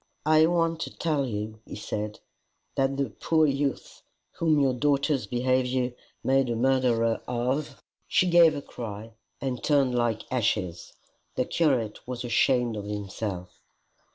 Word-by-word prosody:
"I 155 +1 +5
want 165 -1 +1
to - - -6
tell 150 -5 0
you," 110 -1 -4
he - - -9
said, 105 0 -4 0.5
"that 135 0 0
the 140 -5 -1
poor 160 +9 +2
youth 140 -1 -2 0.4
whom 160 -3 +3
your 135 -2 +3
daughter's 140 +1 +1
behaviour 125 0 0 0.3
made 135 -1 +2
a 120 - 0
murderer 120 -2 +2
of, 125 +5 -2
" - - -47
She 185 - +3
gave 170 -3 +6
a 140 - -5
cry, 110 -1 -7 0.3
and 130 -3 -3
turned 140 -4 +3
like 120 -2 0
ashes. 105 -8 -1 0.4
The - - +1
curate 130 -10 +1
was 125 -1 -4
ashamed 120 -1 +2
of 100 - -5
himself. 100 -2 -5
125 Hz, 145 wpm, -27 LUFS, 115-145 Hz, 0.5 s, gave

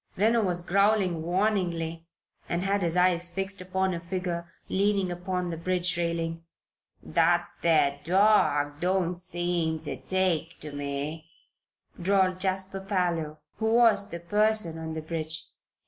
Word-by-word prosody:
Reno 225 +4 +3
was 175 -3 0
growling 195 -3 +2
warningly 170 -3 -1 0.4
and 170 +1 0
had 200 +1 +1
his 170 0 0
eyes 180 -1 +3
fixed 195 +2 -2
upon 190 +1 -1
a 170 - -3
figure 170 -1 -4 0.2
leaning 195 -1 +1
upon 180 0 -3
the 165 - -4
bridge 180 +1 0
railing. 165 -1 -2 0.6
"That 170 - +2
there 145 -4 +3
dawg 165 -6 +3
don't 180 -1 0
seem 175 -3 -1
ter - - -5
take 180 -3 -1
to 150 - -5
me," 145 +3 -5 0.7
drawled 185 0 +2
Jasper 190 0 -1
Parloe, 175 -6 -1 0.2
who 220 0 +1
was 220 -4 +5
the 170 - -5
person 210 -2 +1
on 160 0 -5
the 160 - -5
bridge. 160 0 -3
175 Hz, 135 wpm, -27 LUFS, 165-190 Hz, 0.7 s, was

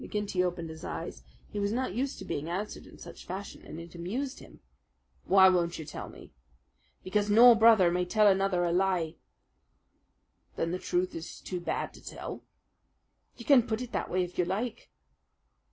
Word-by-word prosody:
McGinty 205 -3 -1
opened 175 -2 -3
his 160 0 -11
eyes. - - -6 0.3
He 205 - -3
was 200 0 0
not 250 -3 -1
used 260 +5 -2
to - - -8
being 150 +3 -4
answered 200 +5 -4
in - - -15
such - - -11
fashion, 195 +2 -6
and 155 +2 -9
it 170 0 -10
amused 225 +11 -4
him. - - -15 0.7
"Why 190 0 +7
won't 170 -2 +2
you 160 - -7
tell - - -7
me?" - - -14 0.7
"Because 205 +2 0
no 235 +4 +9
brother 220 -6 +6
may 180 +1 0
tell 215 +4 +3
another 195 -2 +3
a 170 - +1
lie." 180 -3 0 1.4
"Then 165 - -1
the 180 - -2
truth 180 +1 -1
is 165 +1 -7
too 180 - -5
bad 175 - -3
to - - -15
tell?" - - -7 1.0
"You 235 - -10
can 275 -4 +7
put 220 -1 -3
it 250 -1 -6
that - - -2
way 185 0 +1
if 180 0 -7
you 180 - +3
like." 210 +6 -3
185 Hz, 185 wpm, -29 LUFS, 175-215 Hz, 1.4 s, no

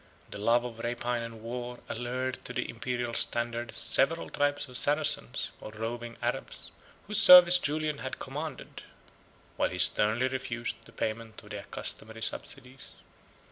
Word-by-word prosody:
The - - -6
love 120 +3 +3
of 115 -2 -7
rapine 120 +1 -1
and 115 -1 -8
war 120 +1 -5
allured 125 +2 -3
to 125 - -3
the 125 -1 -1
Imperial 120 0 -3
standard 120 0 -1
several 165 +5 +2
tribes 145 0 0
of 125 - -12
Saracens, 145 - 0
or - - -7
roving 115 +2 -5
Arabs, - - -3 0.3
whose 210 +1 0
service 180 -1 +10
Julian 150 -1 -1
had 130 - -5
commanded, 145 +2 -6 0.8
while - - +2
he 90 - -5
sternly 110 +7 +3
refused 120 -3 -4
the - - -15
payment 110 0 -4
of 105 - -13
the 105 - -4
accustomed 110 +2 -6
subsidies. 125 +4 -5
120 Hz, 145 wpm, -30 LUFS, 115-135 Hz, 0.8 s, service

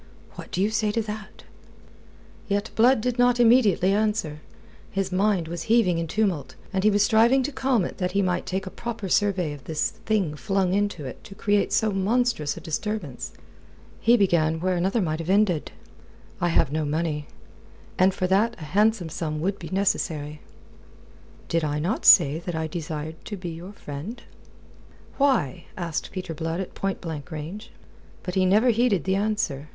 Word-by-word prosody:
"What - - -10
do 185 - 0
you 210 - +1
say 215 -1 +1
to 230 - +1
that?" 210 0 -8 1.0
Yet 205 +1 -1
Blood 240 +1 +5
did 245 +1 -2
not 245 0 +4
immediately 225 -6 +5
answer. 210 -8 -1 0.5
His 195 -1 -2
mind 190 -2 +1
was 170 0 -5
heaving 210 -7 +4
in 165 - -2
tumult, 190 -7 -1 0.2
and 190 0 0
he 215 - +6
was 205 -1 +3
striving 230 +5 +4
to 290 - -2
calm 260 -7 +1
it - - -7
that 180 -1 -1
he 200 0 +2
might 180 -1 -1
take 190 +1 -2
a 190 - -6
proper 230 0 -5
survey 185 -6 +1
of 140 -3 -12
this 155 -1 -1
thing 195 -9 -1
flung 195 +1 0
into 205 -6 -1
it 130 - -8
to 195 - -11
create 205 0 +1
so 220 -1 +2
monstrous 195 - 0
a - - -7
disturbance. 165 - -4 0.7
He 235 +2 +5
began 160 -6 +2
where 185 +2 0
another 190 +5 +1
might 155 -2 -2
have 165 +1 -5
ended. 195 -5 +2 0.7
"I 175 - +2
have 155 -4 +2
no 155 +1 0
money. 150 0 -2 0.7
And 185 +1 +5
for 185 -1 -2
that 205 +6 +2
a - - -8
handsome 210 -4 +2
sum 155 -1 -3
would 195 +4 -1
be 165 - -8
necessary." 155 -6 -1 1.1
"Did 165 -1 0
I 150 -1 -1
not 170 +8 -1
say 145 +3 +7
that 175 0 -5
I 160 0 -1
desired 160 -1 -5
to 205 - -5
be 180 -2 -5
your 170 +4 -8
friend?" 165 - -7 1.0
"Why?" 260 - +1
asked 170 -4 -3
Peter 185 -3 -5
Blood 165 +2 -3
at 190 - -5
point 195 -1 -3
blank 160 -4 -6
range. 175 +8 -7 0.5
But 180 - -4
he 185 0 +2
never 215 +6 +4
heeded 225 - +2
the 190 - 0
answer. 195 -8 -1
190 Hz, 180 wpm, -25 LUFS, 160-215 Hz, 1.1 s, say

